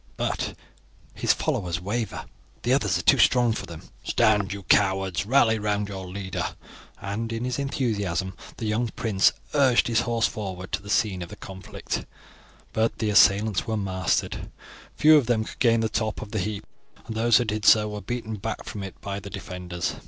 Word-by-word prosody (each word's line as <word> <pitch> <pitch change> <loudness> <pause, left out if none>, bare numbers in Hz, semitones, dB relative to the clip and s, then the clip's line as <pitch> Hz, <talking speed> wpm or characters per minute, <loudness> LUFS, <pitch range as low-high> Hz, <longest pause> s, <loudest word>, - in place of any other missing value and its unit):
But - - -2 0.6
his - - +1
followers 90 -2 -1
waver. 105 +4 -3 0.4
The 120 +3 +2
others 105 -9 +2
are 90 - -4
too 135 - +5
strong 120 -1 +4
for - - -5
them. 85 -2 -9 0.2
Stand, 105 -4 +2
you 100 0 -5
cowards, 95 -1 +2
rally 115 -3 +4
round 105 -1 -1
your 95 -2 -6
leader!" 95 +1 -4 0.4
and 105 +3 -4
in 115 +2 -3
his 125 +2 -2
enthusiasm 100 -10 -1 0.2
the 115 - -4
young 110 +3 0
prince 105 -4 +2 0.2
urged 135 -5 +4
his 115 -2 +2
horse 115 -1 +1
forward 95 -3 -5
to - - -1
the 100 - -11
scene 100 -3 +1
of 85 - -8
conflict. 95 -2 -5 0.7
But 110 +1 +1
the 110 -2 0
assailants 100 0 +4
were 110 -1 -1
mastered; 95 -3 -1 0.5
few 155 0 +7
of 135 -6 +1
them 115 -3 +2
could - - -10
gain 115 -2 +4
the 110 - +1
top 110 0 -2
of 105 - -12
the 110 - -1
heap, 100 +2 -3 0.4
and 110 - -6
those 115 0 +4
who 120 - +1
did 105 -1 -2
so 105 0 +6
were 105 -1 -5
beaten 115 -2 -4
back 110 +3 -4
from 105 - -6
it 95 -1 -8
by 100 0 -4
the 100 - -9
defenders. 90 -3 -5
105 Hz, 185 wpm, -25 LUFS, 95-115 Hz, 0.7 s, few